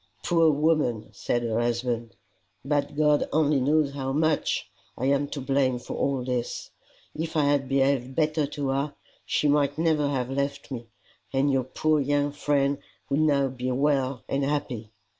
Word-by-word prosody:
"Poor 165 -2 +4
woman!" 150 -8 +1
said 120 +4 -1
her 115 -1 0
husband. 120 -1 -1 0.2
" - - -44 0.2
But 145 0 0
God 150 -1 +3
only 150 -2 +3
knows 145 +1 +2
how 135 -1 -3
much 155 +2 +1 0.3
I 130 - -2
am 140 +1 +2
to 145 - -5
blame 135 -1 +1
for 120 - -7
all 135 -2 0
this. 125 -1 -3 0.4
If 160 +1 -3
I 150 - +4
had 140 -2 +1
behaved 135 -1 +1
better 155 -1 +1
to 140 -1 -3
her 140 +2 -1 0.3
she 150 - +1
might 145 0 +2
never 160 -3 +2
have 130 -2 -2
left 140 +1 -2
me, 120 -3 -5 0.4
and 140 +1 +2
your 130 -2 +1
poor 155 +3 +1
young 145 +1 +1
friend 140 -1 +1 0.3
would 140 - +2
now 145 -3 +3
be 125 0 -4
well 135 -1 +1
and 140 +1 0
happy." 135 -6 -2
140 Hz, 170 wpm, -26 LUFS, 130-150 Hz, 0.4 s, Poor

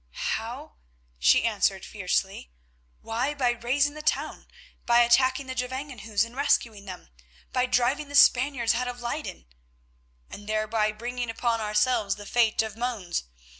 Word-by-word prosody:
"How?" 65 - -6 0.4
she 65 +1 +5
answered - - +1
fiercely. - - -2 0.5
"Why, 245 +6 -2
by 255 -4 +2
raising 270 +5 0
the 305 - -8
town; 300 0 -2 0.4
by 235 0 +6
attacking 260 +3 +3
the 260 - -5
Gevangenhuis 250 -4 -2
and 230 +2 -13
rescuing 230 -7 0
them, 185 -3 -9 0.4
by 250 0 +1
driving 250 +4 +1
the 285 - -6
Spaniards 255 -3 +5
out 250 +2 -1
of 245 0 -5
Leyden——" 240 - -5 0.8
"And 205 +1 -11
thereby 215 0 0
bringing 240 +2 -5
upon 230 0 -1
ourselves 210 0 +1
the 205 - -10
fate 225 -1 +2
of 220 -1 -6
Mons. 225 - -3
240 Hz, 140 wpm, -26 LUFS, 215-260 Hz, 0.8 s, by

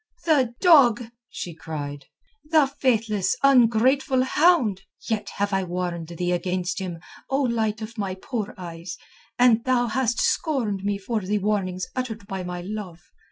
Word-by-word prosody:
"The 265 -8 +2
dog!" 245 - +5 0.2
she 175 - -6
cried. 145 -3 -6 0.4
"The 310 -1 +4
faithless, 225 -7 0
ungrateful 260 +1 +4
hound! 260 - +3 0.3
Yet 215 -2 -2
have 205 0 0
I 195 0 +1
warned 175 -2 -3
thee 175 +1 -3
against 180 0 -1
him, 180 -3 -5 0.3
O 275 +1 +1
light 220 -3 -1
of 220 +1 -8
my 195 -2 -2
poor 210 +2 -5
eyes, 170 -1 -7 0.4
and 240 -2 +4
thou 255 -2 +2
hast 240 0 0
scorned 230 - 0
me 200 0 0
for 215 +3 -3
the 205 +2 -1
warnings 190 -3 -1
uttered 230 -4 -4
by 195 -1 -5
my 180 0 -5
love. 190 -3 -6
210 Hz, 150 wpm, -24 LUFS, 185-250 Hz, 0.4 s, dog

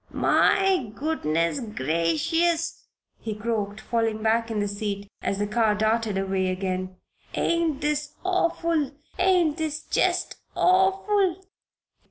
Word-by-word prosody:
"My 380 - +3
goodness 170 - 0
gracious!" 225 - 0 0.3
he 220 -2 -4
croaked, 210 -1 -2
falling 225 -2 -1
back 230 +1 +2
in 220 -2 -1
the 205 - 0
seat 200 0 -4
as 200 - -1
the 205 - 0
car 215 0 +2
darted 220 -1 +1
away 190 -1 0
again. 185 0 -2 0.4
"Ain't 330 -4 0
this 300 0 -1
awful? 335 -5 +1 0.3
Ain't 360 -4 +3
this 315 -1 -3
jest - - 0 0.2
awful?" 385 0 +2
230 Hz, 115 wpm, -25 LUFS, 205-335 Hz, 0.4 s, My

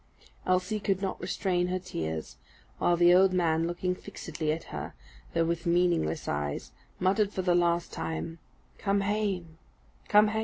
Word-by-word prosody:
Elsie 185 +4 +1
could 195 -2 0
not 195 -1 -3
restrain 180 -2 0
her 185 +1 0
tears; 80 - -4 0.4
while 175 - +3
the 175 +1 +6
old 185 +1 +6
man, 165 -2 +2
looking 175 +1 -1
fixedly 160 -3 -4
at 160 +1 -3
her, - - -5 0.4
though 165 0 +3
with 170 +1 -2
meaningless 170 - +2
eyes, 75 0 -2 0.3
muttered, 200 +2 +2
for 190 - -2
the 180 -1 +3
last 170 0 +2
time, 80 - -4 0.4
"_Come 200 -1 +1
hame! 195 -6 -1 0.5
come 210 0 +6
hame! 220 +1 -1
175 Hz, 155 wpm, -29 LUFS, 165-190 Hz, 0.5 s, the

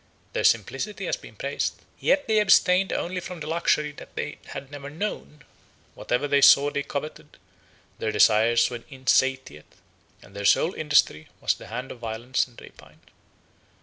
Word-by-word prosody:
Their - - -1
simplicity - - 0
has - - 0
been - - -14
praised; - - -2 0.2
yet 285 0 +1
they 220 -1 +3
abstained 190 -2 +4
only 180 +2 -2
from 180 -1 -8
the 150 - -6
luxury 155 -2 0
they 150 0 -7
had 135 0 -8
never 145 -1 -8
known; 150 -2 -6 0.5
whatever 125 +4 -2
they 140 0 +3
saw 140 +1 +7
they 140 - -2
coveted; 140 +2 -7 0.6
their 110 - -1
desires 115 +2 +4
were 120 -1 -6
insatiate, 130 - -1 0.5
and 100 - -18
their 100 - -5
sole 160 - +3
industry 145 - +1
was - - +1
the - - -12
hand 125 +6 -6
of 120 - -10
violence 115 +3 -2
and 120 - -16
rapine. - - -16
140 Hz, 155 wpm, -25 LUFS, 120-160 Hz, 0.6 s, saw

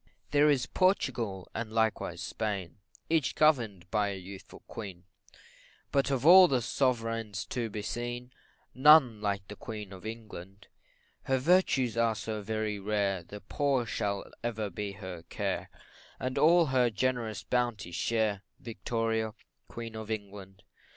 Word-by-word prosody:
There 150 +1 +5
is 140 -4 +2
Portugal, 120 - 0
and 115 -2 -4
likewise 110 -1 0
Spain, 100 -6 -3 0.3
Each 160 -4 +1
govern'd 115 - +2
by 105 -2 +2
a 100 - -4
youthful 95 +1 -11
Queen, 95 -6 -8 0.9
But 140 0 +2
of 135 -1 -1
all 180 +2 +10
the 130 -6 +1
Sov'reigns 115 -5 -1
to 120 -3 -2
be 105 0 -5
seen, 120 +2 -4 0.4
None 130 -5 +6
like 100 -2 -2
the 105 - -8
Queen 105 -4 -7
of 95 -1 -11
England: 105 -4 -9 0.6
Her 135 - +2
virtues 130 - +2
are 115 -1 +2
so 110 0 -4
very 110 0 -2
rare, 100 -2 0
The 100 +5 -10
poor 135 +4 0
shall 100 -2 -2 0.2
ever 110 -3 -2
be 100 +2 -4
her 95 -4 -8
care, - - -2 0.5
And 130 0 -2
all 170 +2 +6
her 130 -4 +3
generous 115 0 -1
bounty 120 -7 -1
share, 105 +2 0 0.2
Victoria, 115 -1 -2 0.3
Queen 115 -1 -7
of 110 -1 -7
England. 100 -3 -6
110 Hz, 140 wpm, -30 LUFS, 100-125 Hz, 0.9 s, all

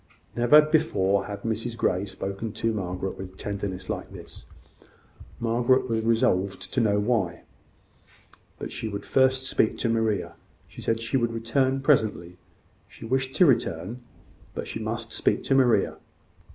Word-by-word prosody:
Never 120 +6 +6
before 150 - +1
had 100 -1 -7
Mrs 115 +1 -3
Grey 95 -3 +1
spoken 100 +2 -5
to 115 +1 -1
Margaret 95 -2 -4
with 95 0 -8
tenderness 100 -2 -4
like - - -4
this. - - -11 0.9
Margaret 120 +3 +2
was 110 -2 -1
resolved 100 -5 +1
to 130 - +2
know 105 -2 +2
why 105 -5 +1
now; - - -18 1.2
but - - -6
she 110 - -4
would 100 -1 -5
first 130 0 +3
speak 110 -4 +1
to 115 - 0
Maria. 110 -2 0 0.3
She - - -11
said 115 0 0
she 115 +4 0
would 120 -2 0
return 130 +4 0
presently: 110 - +1 0.5
she - - -12
wished 130 +2 -1
to 180 - +6
return: 115 - 0 0.5
but - - -4
she - - -5
must 115 +1 -4
speak - - 0
to - - +1
Maria. 130 -3 +3
115 Hz, 150 wpm, -26 LUFS, 100-125 Hz, 1.2 s, Never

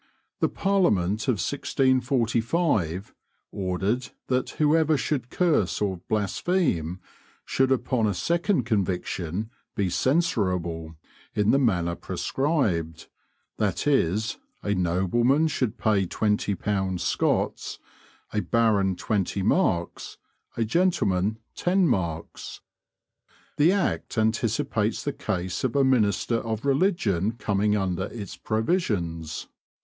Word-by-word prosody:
The - - +2
Parliament 110 - +1
of 130 - +3
1645 125 - 0 0.4
ordered 95 +6 -1 0.2
that 130 -1 +1
whoever 155 0 +3
should 130 -2 -2
curse 145 - +1
or 100 -3 -1
blaspheme 105 - 0 0.5
should 135 0 +1
upon 125 -3 +1
a 100 - -1
second 170 - +1
conviction 95 -2 -2 0.2
be 95 -3 0
"censurable" 90 - 0 0.4
in 105 0 +3
the 135 - +4
manner 90 -10 +1
prescribed, 90 - -1 0.5
that 105 +1 -1
is, 110 - +1 0.3
a 105 - 0
nobleman 100 - +2
should 130 -7 -1
pay 100 -4 +2
twenty 105 +1 0
pounds 95 -1 -1
Scots, - - 0 0.6
a 105 - +1
baron 105 -4 +2
twenty 100 0 -1
marks, 95 - 0 0.4
a 115 - +1
gentleman 110 - +1 0.2
ten 185 +1 +2
marks. 85 - -3 1.0
The 155 +4 +5
Act 195 -10 -1
anticipates 110 0 0
the 145 - -2
case 95 -8 -3
of 130 -1 -1
a 140 - +4
minister 115 -3 +2
of 115 +1 -4
religion 135 - +1
coming 105 -1 +1
under 95 -2 -1
its 105 -3 -7
provisions. 100 - -1
110 Hz, 105 wpm, -26 LUFS, 95-135 Hz, 1.0 s, The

